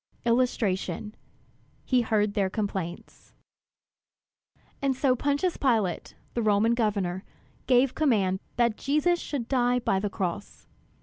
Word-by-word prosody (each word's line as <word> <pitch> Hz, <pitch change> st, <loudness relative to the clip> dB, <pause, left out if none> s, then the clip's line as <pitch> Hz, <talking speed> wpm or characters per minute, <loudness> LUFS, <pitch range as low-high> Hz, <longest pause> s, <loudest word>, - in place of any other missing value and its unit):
[Illustration: 215 Hz, -5 st, 0 dB, 0.7 s
He 255 Hz, -2 st, +3 dB
heard 210 Hz, -2 st, +1 dB
their 200 Hz, -3 st, +1 dB
complaints] 190 Hz, -4 st, -5 dB, 1.5 s
And 275 Hz, -1 st, +1 dB
so 260 Hz, -1 st, +2 dB
Pontius 285 Hz, +7 st, 0 dB
Pilate, 220 Hz, -10 st, 0 dB, 0.2 s
the 240 Hz, -, -1 dB
Roman 215 Hz, +1 st, +3 dB
governor, 200 Hz, -5 st, -1 dB, 0.4 s
gave 255 Hz, 0 st, +4 dB
command 205 Hz, -11 st, +1 dB, 0.2 s
that 235 Hz, -2 st, +2 dB
Jesus 305 Hz, +5 st, +1 dB
should 270 Hz, -8 st, -4 dB
die 245 Hz, -1 st, +2 dB
by 215 Hz, -5 st, 0 dB
the 205 Hz, +1 st, -2 dB
cross. 190 Hz, +1 st, -5 dB
230 Hz, 115 wpm, -27 LUFS, 200-255 Hz, 1.5 s, gave